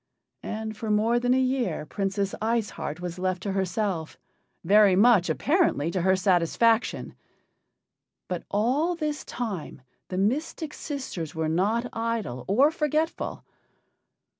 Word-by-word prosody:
And 220 0 -5
for 220 +1 -5
more 220 +3 +3
than 245 +1 +2
a - - +3
year 255 - 0
Princess 195 +2 -2
Ice 225 -1 0
Heart 155 +4 -5
was 180 0 -5
left 185 0 -1
to 200 - -2
herself 190 -3 -2 0.5
very 200 +1 +6
much, 210 -2 +5
apparently, 285 - +1
to 185 - -1
her 190 +2 +3
satisfaction. 190 +5 +2 1.1
But 180 -2 -3
all 265 - +1
this 305 -2 -3
time 195 - -5 0.2
the 185 - -4
mystic 290 - -1
sisters 225 - -5
were 160 -1 -1
not 205 +9 +1
idle 225 - -3
or 265 +10 +4
forgetful. 310 0 -1
210 Hz, 130 wpm, -26 LUFS, 185-245 Hz, 1.1 s, very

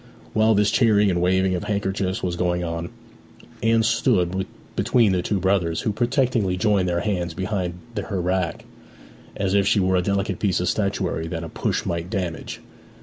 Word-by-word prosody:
While 110 0 +4
this 105 +1 +3
cheering 105 -5 +4
and 85 -1 0
waving 95 +1 +2
of 90 - -2
handkerchiefs 95 -2 -1
was 90 -1 -1
going 90 0 0
on 85 0 -4 0.7
Anne 115 0 +3
stood 95 -5 +1 0.3
between 115 -5 +3
the 90 -1 +1
two 100 +2 -1
brothers, 90 -3 +1
who 110 - 0
protectingly 120 -4 +1
joined 95 -1 +2
their 85 0 0
hands 90 -5 -2
behind 95 -2 -2 0.3
her 95 - -3
back, 90 -2 -1 0.7
as 100 -1 -1
if 100 -1 +3
she 110 -1 +3
were 95 -1 +2
a - - +3
delicate 100 0 -1
piece 100 -4 +1
of 90 - 0
statuary 95 -5 -1
that 85 0 -4
a 80 - -6
push - - -2
might 85 0 -3
damage. 90 -5 -4
95 Hz, 175 wpm, -23 LUFS, 90-105 Hz, 0.7 s, While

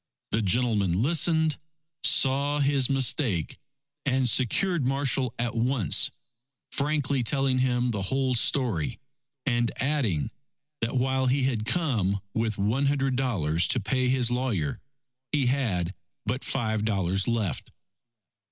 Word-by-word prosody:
The 110 - +1
gentleman 100 -3 +1
listened, 160 0 +2 0.4
saw 140 +2 +4
his 140 -2 +2
mistake, 130 - 0 0.4
and 130 -2 +1
secured 130 - +2
Marshall 135 -2 +1
at 120 0 -2
once, 120 - +2 0.6
frankly 140 -2 0
telling 135 +1 +1
him 125 -1 +1
the 105 -3 -3
whole 130 +6 0
story, 120 - 0 0.5
and 120 -3 +1
adding, 125 - 0 0.5
that 115 +3 -2
while 130 +1 +1
he 135 +2 +2
had 120 -4 -1
come 115 - 0
with 110 -2 -1
one 115 +8 +1
hundred 135 -2 +1
dollars 90 - +1
to 125 - +3
pay 130 +4 0
his 125 -2 +1
lawyer, 120 - -1 0.5
he 145 -3 +1
had 110 -10 0 0.3
but 125 +5 -2
five 110 -5 -1
dollars 95 -3 0
left. 115 -6 -2
125 Hz, 125 wpm, -26 LUFS, 110-135 Hz, 0.6 s, saw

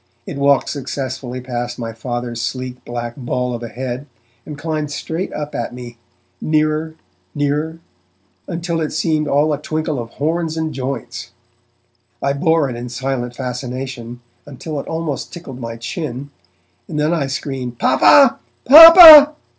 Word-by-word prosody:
It - - -7
walked 140 -1 +2
successfully 130 -2 -5
past 120 -1 -5
my 115 -2 -6
Father's 120 0 -5
sleek 125 +1 -5
black 120 -1 -6
ball 125 -1 -3
of 120 - -6
a 120 - -6
head, 125 +3 -6 0.4
and 150 - -8
climbed 155 -1 -4
straight 160 +5 -5
up 150 0 -6
at 120 +1 -5
me, 120 -1 -11 0.4
nearer, 155 +1 -1 0.4
nearer, 150 +3 -2 0.7
until 170 -1 -3
it 155 - -2
seemed 155 -1 -1
all 150 +2 +1
a 145 - -5
twinkle 155 -3 -3
of 115 -1 -7
horns 160 +2 -2
and 160 -1 -3
joints. 135 +1 -6 0.9
I 140 - -1
bore 160 +1 +1
it 125 - -6
in 120 +1 -7
silent 125 -1 -4
fascination 125 -1 -6 0.3
until 145 +2 -7
it - - -8
almost 160 -4 -4
tickled 135 -7 -10
my 115 -1 -7
chin, 135 +3 -6 0.6
and 150 - -5
then 155 +3 +1
I 150 -5 -1
screamed 130 -2 -5
'Papa! 270 - +4 0.3
Papa!' 315 0 +10
140 Hz, 145 wpm, -17 LUFS, 125-155 Hz, 0.9 s, Papa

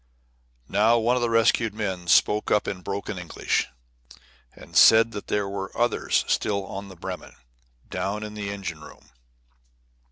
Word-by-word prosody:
Now 110 - +3
one 120 +2 +2
of 125 - 0
the 120 - +1
rescued 115 -1 +2
men 95 -5 -4
spoke 105 +4 +3
up 105 - +2
in 90 -2 -4
broken 100 +1 -5
English, 90 - -1 0.8
and - - -15
said 115 +1 +7
that 105 -2 -7
there 105 -1 -1
were 100 -1 -5
others 120 0 +1
still 100 -2 0
on 100 +1 -7
the 95 - -12
Bremen, - - -8 0.5
down 105 +2 -3
in 105 0 -7
the 105 -1 -5
engine 95 -6 -6
room. - - -15
105 Hz, 155 wpm, -25 LUFS, 95-110 Hz, 0.8 s, said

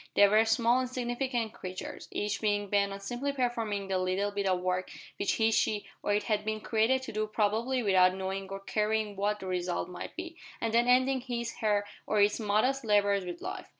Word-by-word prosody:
They 205 - +7
were 215 +2 +4
small 235 +3 +3
insignificant 245 -2 -2
creatures, 185 0 -7
each 205 0 -2
being 205 -2 0
bent 200 -1 +2
on 195 0 -7
simply 245 +7 -3
performing 230 -6 -1
the 190 -1 0
little 185 +2 0
bit 200 -1 -1
of 185 -1 +2
work 185 0 -1 0.3
which 200 - +1
he, 225 0 +2
she, 215 -1 +1 0.2
or - - -1
it 210 - 0
had 210 -1 0
been 215 0 -2
created 230 +5 +1
to - - -6
do 215 0 -1
probably 225 +4 0
without 185 -2 +4
knowing 190 0 -4
or 195 0 -6
caring 215 0 -1
what 205 +2 0
the - - -6
result 180 -1 -2
might 180 - -7
be, 340 -1 -7 0.2
and 225 -1 -2
then 235 +1 +4
ending 260 +1 +4
his, 235 -2 -4
her, 205 -2 +1 0.2
or 210 - +1
its 205 +2 +3
modest 225 +6 +1
labours 205 -3 +2
with 175 -1 -6
life. - - -6
210 Hz, 205 wpm, -30 LUFS, 200-235 Hz, 0.3 s, They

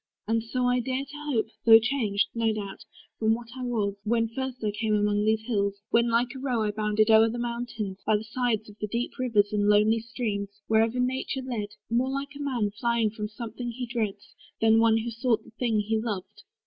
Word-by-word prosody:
And 225 0 +1
so 250 +2 -1
I 245 0 +3
dare 260 +2 -2
to 295 +1 -6
hope 225 -3 0
Though 225 -1 +9
changed, 225 -4 0
no 230 -1 +1
doubt, 205 -2 -6 0.3
from 220 0 +3
what 235 0 -9
I 260 - -6
was, 220 -5 0
when 230 +1 +1
first 260 +1 -5
I 210 - +1
came 215 +1 0
among 205 0 +2
these 220 0 +2
hills; 200 -4 0 0.2
when 235 0 +4
like 235 +3 +1
a - - -6
roe 250 -4 0
I 210 - 0
bounded 215 +1 +2
o'er 220 +1 +7
the 235 - -4
mountains, 235 -5 -4
by 215 - +3
the 210 - -6
sides 220 -1 -1
Of 210 0 -14
the 210 - -2
deep 235 +4 -2
rivers, 215 -5 +2
and 205 -1 +2
the - - +3
lonely 220 +2 +3
streams, 210 -3 -4
Wherever 225 +2 +2
nature 260 +1 -1
led; 210 -5 -4 0.2
more 245 +3 +2
like 275 +2 -4
a 290 - -7
man 245 -7 0
Flying 230 0 0
from 210 -1 -4
something 230 +2 -6
that 235 - -5
he 255 0 -3
dreads, 220 -4 -4 0.3
than 225 0 +5
one 225 -1 +5
Who 230 +1 -2
sought 230 -1 0
the - - -16
thing 225 -2 0
he 220 +1 0
loved. 210 -2 -5
225 Hz, 225 wpm, -27 LUFS, 210-245 Hz, 0.3 s, Though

